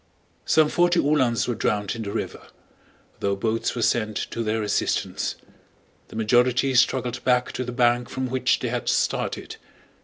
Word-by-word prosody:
Some 155 -1 +5
forty 175 +1 +3
Uhlans 130 -5 +2
were 120 - 0
drowned 105 -2 -1
in 115 - -5
the 100 -2 -4
river, - - -5 0.7
though 100 0 0
boats 110 +3 -1
were 120 - -1
sent 110 -2 +1 0.2
to 115 - -3
their 110 0 -1
assistance. 105 -1 -1 0.7
The - - -13
majority 125 +4 +2
struggled 125 -1 +1
back 125 -1 +2
to 130 - -3
the 125 - -5
bank 120 0 +2
from 130 0 -3
which 130 +1 +1
they - - -3
had - - -2
started. - - -1
120 Hz, 160 wpm, -24 LUFS, 110-130 Hz, 0.7 s, Some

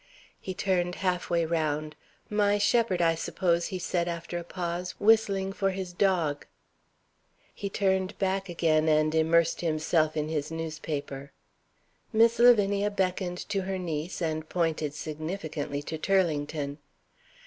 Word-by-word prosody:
He 185 - -6
turned 180 -2 0
half 180 -1 0
way 170 -1 +2
round. 155 -2 -1 0.3
"My 205 -1 +2
shepherd, 205 -3 +2
I 165 0 +4
suppose," 170 +1 0
he 185 - -4
said 175 -1 -1
after 170 0 -4
a - - -7
pause 175 0 -4
"whistling 200 -3 +3
for 195 0 0
his 185 -2 -5
dog." 175 -6 +1 1.1
He 200 - -5
turned 190 -1 0
back 195 0 -1
again 160 -2 +2
and 155 0 +3
immersed 165 +1 +3
himself 155 -1 +1
in 150 0 0
his 150 -2 -2
newspaper. 155 -4 -5 0.8
Miss 230 +1 +4
Lavinia 205 -4 +5
beckoned 185 -2 -2
to 200 -1 0
her 190 0 -3
niece 170 0 -4
and 155 -1 -2
pointed 160 -4 -1
significantly 155 -2 -4
to 160 +1 -5
Turlington. 150 -6 0
175 Hz, 135 wpm, -28 LUFS, 155-190 Hz, 1.1 s, Lavinia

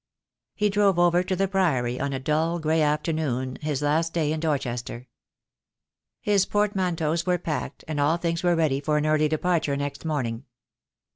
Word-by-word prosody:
He 210 -1 +1
drove 200 -2 +3
over 175 0 +4
to 185 +1 -2
the 195 +2 +1
Priory 135 -11 0
on 140 0 -1
a 135 - -2
dull, 155 +5 0
grey 160 0 +1
afternoon, 150 -4 -1
his 150 -2 -2
last 160 +3 +1
day 155 -3 +1
in 160 - -3
Dorchester. 125 -5 -3 1.1
His 200 -2 +2
portmanteaus 180 -5 0
were 180 0 +3
packed, 160 -3 -4
and 155 -2 -3
all 150 +4 +3
things 170 0 -2
were 175 -2 +2
ready 155 -5 +1
for 150 +1 +1
an 150 - 0
early 155 0 +3
departure 155 -2 0
next 140 0 -4
morning. 130 -6 -2
155 Hz, 165 wpm, -25 LUFS, 145-175 Hz, 1.1 s, over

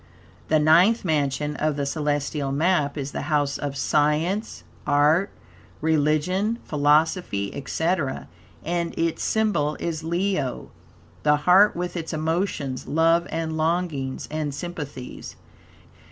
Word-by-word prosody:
The 155 - +3
Ninth 175 +9 +4
Mansion 150 -2 0
of 155 -1 0
the 140 -1 -2
celestial 145 -1 -1
map 150 -1 +1
is 140 -1 -4
the - - -4
House 145 -2 +1
of 140 -1 -4
Science, 155 - 0 0.2
Art, 150 +7 +3 0.5
Religion, 160 +8 +1
Philosophy, 150 - +1
etc., 160 0 -2 0.4
and 170 0 -2
its 165 -1 -1
symbol 195 -9 +1
is 165 -2 -3
Leo, 170 -5 -2 0.5
the 150 0 +4
Heart, 195 +4 +6
with 175 +1 -4
its 165 -1 -4
emotions, 155 -4 -2
love, 165 +2 +3
and 160 0 -3
longings, 155 -5 -1
and 155 -2 -3
sympathies. 145 -7 -7
155 Hz, 115 wpm, -24 LUFS, 145-175 Hz, 0.5 s, Heart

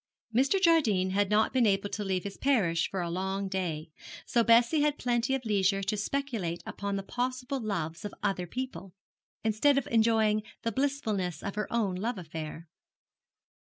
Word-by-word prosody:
Mr. 270 - +3
Jardine 235 - +3
had 200 0 +1
not 215 +3 +3
been 250 -4 +4
able 195 0 +1
to 210 - -3
leave 190 -2 -1
his 200 -1 -6
parish 195 -12 +1
for 190 - -2
a 170 - -2
long 190 +2 -2
day; 170 -5 -3 0.3
so 235 - +2
Bessie 235 +7 +5
had 295 0 +2
plenty 245 +2 +1
of 260 -2 -5
leisure 195 -2 +2
to 210 - 0
speculate 210 -7 -2
upon 200 0 -3
the 195 - -3
possible 255 +4 -2
loves 170 -8 -3
of 205 - -4
other 195 -3 0
people, 245 -5 -6 0.5
instead 220 +6 +3
of 275 - +1
enjoying 220 -2 +3 0.2
the 230 - 0
blissfulness 215 - -1
of 200 - -3
her 210 -1 -3
own 220 -5 +1
love 215 +5 -2
affair. 160 -1 -7
210 Hz, 170 wpm, -29 LUFS, 190-245 Hz, 0.5 s, Bessie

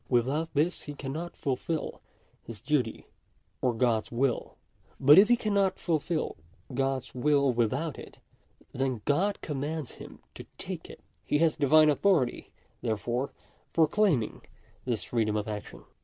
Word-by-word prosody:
Without 135 +7 +1
this 160 +5 +1
he 145 - -6
cannot 155 +6 -5
fulfil 155 +3 -3 0.4
his 115 -3 -9
duty 130 -4 -1 0.6
or 125 - +2
God's 115 -2 +1
will. 125 +1 -1 0.4
But 145 +6 +8
if 205 - +7
he 240 - +5
cannot 200 -4 +1
fulfil 165 -1 -1 0.4
God's 135 0 -1
will 140 0 +2
without 130 +7 -1
it, - - -11 0.5
then 130 -4 -2
God 190 +8 +1
commands 150 0 -4
him - - -10 0.2
to - - -10
take - - -6
it. - - -12 0.2
He - - +1
has 160 0 +3
Divine 155 +1 +5
authority, 155 -4 +1 0.3
therefore, 120 +4 -2 0.4
for 160 -2 +4
claiming 170 - +1 0.4
this 120 -4 -1
freedom 110 -3 0
of 105 0 -1
action. 105 -1 -7
140 Hz, 140 wpm, -29 LUFS, 120-160 Hz, 0.6 s, But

